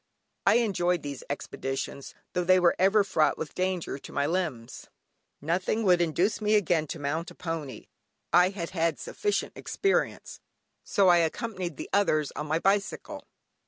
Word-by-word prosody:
I -, -, +6 dB
enjoyed 180 Hz, -7 st, +1 dB
these 140 Hz, -3 st, -6 dB
expeditions, 135 Hz, -1 st, -5 dB, 0.2 s
tho' 180 Hz, -, 0 dB
they 185 Hz, +1 st, +5 dB
were 175 Hz, -1 st, +4 dB
ever 195 Hz, +3 st, +5 dB
fraught 160 Hz, -6 st, +2 dB
with 155 Hz, -, -5 dB
danger 185 Hz, -5 st, -2 dB
to -, -, -11 dB
my 140 Hz, -, 0 dB
limbs. 150 Hz, -8 st, -3 dB, 0.5 s
Nothing 180 Hz, +8 st, 0 dB
would 180 Hz, -3 st, +4 dB
induce 175 Hz, +6 st, +1 dB
me 210 Hz, 0 st, +3 dB
again 175 Hz, -6 st, +2 dB
to 165 Hz, -, -5 dB
mount 155 Hz, +4 st, -3 dB
a -, -, -14 dB
pony 165 Hz, -6 st, -5 dB, 0.5 s
(I 180 Hz, +1 st, +6 dB
had 185 Hz, -3 st, -5 dB
had 165 Hz, -3 st, 0 dB
sufficient 415 Hz, -1 st, -2 dB
experience) 395 Hz, -1 st, -1 dB, 0.4 s
so 195 Hz, -2 st, +3 dB
I 175 Hz, -, +7 dB
accompanied 175 Hz, 0 st, -2 dB
the -, -, -6 dB
others 155 Hz, -7 st, +2 dB
on 150 Hz, -, -4 dB
my 155 Hz, +2 st, +1 dB
bicycle. 195 Hz, +3 st, -1 dB
175 Hz, 160 wpm, -28 LUFS, 155-190 Hz, 0.5 s, I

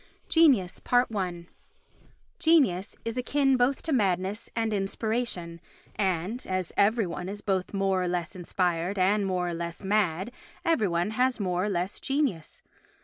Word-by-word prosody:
Genius 265 Hz, -, +3 dB
i 195 Hz, -8 st, +1 dB, 0.9 s
Genius 275 Hz, -, +3 dB
is 230 Hz, +2 st, -3 dB
akin 270 Hz, +1 st, +2 dB
both 255 Hz, +2 st, +1 dB
to 315 Hz, -, -1 dB
madness 195 Hz, -2 st, 0 dB
and 225 Hz, -1 st, 0 dB
inspiration 195 Hz, -4 st, -2 dB, 0.3 s
and, 190 Hz, +4 st, -1 dB
as 185 Hz, -2 st, -2 dB
every 215 Hz, +2 st, +3 dB
one 180 Hz, +1 st, -5 dB
is 205 Hz, +1 st, -6 dB
both 190 Hz, -3 st, -1 dB
more 195 Hz, -2 st, +1 dB
or 180 Hz, -, 0 dB
less 175 Hz, 0 st, -2 dB
inspired 180 Hz, +1 st, -1 dB
and 195 Hz, +2 st, +2 dB
more 180 Hz, -2 st, -1 dB
or -, -, -3 dB
less 170 Hz, +2 st, -5 dB
mad, 190 Hz, 0 st, +1 dB, 0.3 s
every 325 Hz, -, +2 dB
one 175 Hz, +3 st, 0 dB
has 250 Hz, +2 st, +1 dB
more 180 Hz, -1 st, 0 dB
or -, -, -1 dB
less 180 Hz, 0 st, -2 dB
genius. 270 Hz, -, -2 dB
195 Hz, 145 wpm, -27 LUFS, 180-230 Hz, 0.9 s, Genius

